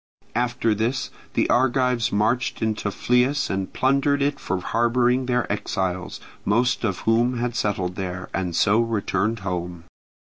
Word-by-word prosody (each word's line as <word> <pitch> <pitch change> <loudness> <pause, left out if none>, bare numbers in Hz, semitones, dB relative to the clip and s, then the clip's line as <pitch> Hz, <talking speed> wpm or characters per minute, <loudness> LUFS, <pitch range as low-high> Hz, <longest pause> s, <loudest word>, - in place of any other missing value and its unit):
After 120 -1 +1
this 115 +5 -1 0.2
the - - +2
Argives 125 -2 +2
marched 110 +4 0
into 110 -2 -1
Phlius 125 +7 +1
and 95 0 -2
plundered 140 +2 +2
it 145 +1 0
for 95 - -2
harbouring 120 +5 +1
their 125 -1 +1
exiles, 95 -3 -3 0.2
most 120 +4 +1
of 100 -5 -1
whom 120 +3 +2
had 120 0 -2
settled 95 -5 -1
there, 95 -1 -4
and 90 -3 -2
so 105 +5 +4
returned 110 -1 0
home. 90 -2 -4
115 Hz, 140 wpm, -23 LUFS, 95-125 Hz, 0.2 s, so